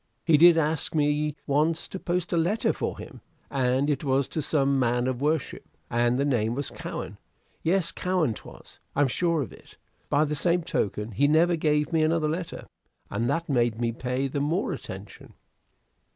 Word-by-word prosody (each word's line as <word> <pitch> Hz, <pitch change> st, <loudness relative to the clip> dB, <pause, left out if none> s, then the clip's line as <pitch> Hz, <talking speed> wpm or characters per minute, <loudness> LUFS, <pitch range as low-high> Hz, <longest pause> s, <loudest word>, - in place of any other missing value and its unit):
He 165 Hz, -, +5 dB
did 170 Hz, +2 st, +7 dB
ask 160 Hz, 0 st, 0 dB
me 150 Hz, 0 st, +1 dB
once 155 Hz, +4 st, +1 dB
to 190 Hz, -, -6 dB
post 180 Hz, 0 st, -2 dB
a -, -, +3 dB
letter 180 Hz, +7 st, +1 dB
for -, -, -3 dB
him, -, -, -10 dB, 0.3 s
and 130 Hz, 0 st, +1 dB
it 145 Hz, -2 st, 0 dB
was 135 Hz, -1 st, +1 dB
to 155 Hz, -, -2 dB
some 140 Hz, -2 st, +1 dB
man 120 Hz, 0 st, +1 dB
of 130 Hz, 0 st, -2 dB
worship, 150 Hz, 0 st, -2 dB
and 120 Hz, +1 st, +2 dB
the 140 Hz, -, +1 dB
name 120 Hz, -4 st, +1 dB
was 140 Hz, 0 st, -3 dB
Cowen, -, -, -6 dB, 0.4 s
yes 170 Hz, -1 st, +2 dB
Cowen 180 Hz, -9 st, 0 dB
'twas. -, -, -13 dB, 0.2 s
I'm 145 Hz, 0 st, +3 dB
sure 165 Hz, +3 st, +1 dB
of -, -, -9 dB
it. -, -, -17 dB, 0.3 s
By 145 Hz, +1 st, +3 dB
the 150 Hz, -, -2 dB
same 170 Hz, +3 st, +1 dB
token, 105 Hz, -4 st, -2 dB
he 140 Hz, +8 st, +2 dB
never 165 Hz, +3 st, +4 dB
gave 150 Hz, -1 st, +1 dB
me 160 Hz, -, +3 dB
another 155 Hz, 0 st, +2 dB
letter, 165 Hz, +3 st, -4 dB, 0.5 s
and 115 Hz, +4 st, -1 dB
that 165 Hz, +4 st, -1 dB
made 120 Hz, -5 st, +1 dB
me 120 Hz, -1 st, 0 dB
pay 125 Hz, +3 st, -2 dB
the 140 Hz, +1 st, -2 dB
more 165 Hz, +7 st, 0 dB
attention." -, -, -9 dB
150 Hz, 180 wpm, -26 LUFS, 130-165 Hz, 0.5 s, did